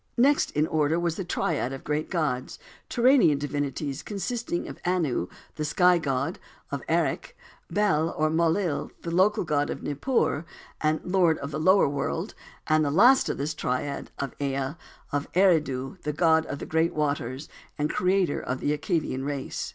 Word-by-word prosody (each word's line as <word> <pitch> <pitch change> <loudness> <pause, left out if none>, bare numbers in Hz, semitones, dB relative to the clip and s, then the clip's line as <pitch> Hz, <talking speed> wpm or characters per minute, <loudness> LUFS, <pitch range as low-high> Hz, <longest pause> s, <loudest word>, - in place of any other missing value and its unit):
Next 280 +4 +4
in 150 +1 +2
order, 155 +1 +1
was 170 0 -1
a - - -1
triad 160 -6 -1
of 135 - -7
great 150 +1 -2
gods, 145 -8 -2 0.3
Turanian 240 - +4
divinities, 140 0 -3
consisting 215 -2 -3
of - - -9
Anu, 165 - 0 0.3
the 155 - -2
Sky 180 +3 +4
God 135 -5 -2 0.3
of - - -3
Erech; - - 0 0.3
Bel, 170 -4 +2
or 155 0 +2
Mul 165 +1 +3
lil, 175 -7 -2
the 170 - -4
local 195 +5 +3
god 145 -3 0
of - - -5
Nippur, 155 - 0 0.4
the 155 0 +2
Lord 180 -3 +3
of 140 +1 -6
the 155 - -3
lower 185 +3 +5
world, 140 0 -2 0.3
and 155 0 +3
last 250 +8 +6
in - - -2
this 145 +3 -2
triad, 140 -1 -3
of 140 -2 -4
Ea, 135 0 -1 0.4
of 145 0 -2
Eridu, 150 -9 +2
the 150 - -3
god 160 +1 +3
of 140 - -4
the - - -6
great 160 +1 +1
waters, 145 -2 -2 0.3
and 150 - +1
creator 185 -3 +1
of 130 +1 -3
the 150 - 0
Accadean 150 -4 -2
race. 140 -1 -4
155 Hz, 165 wpm, -26 LUFS, 145-180 Hz, 0.4 s, last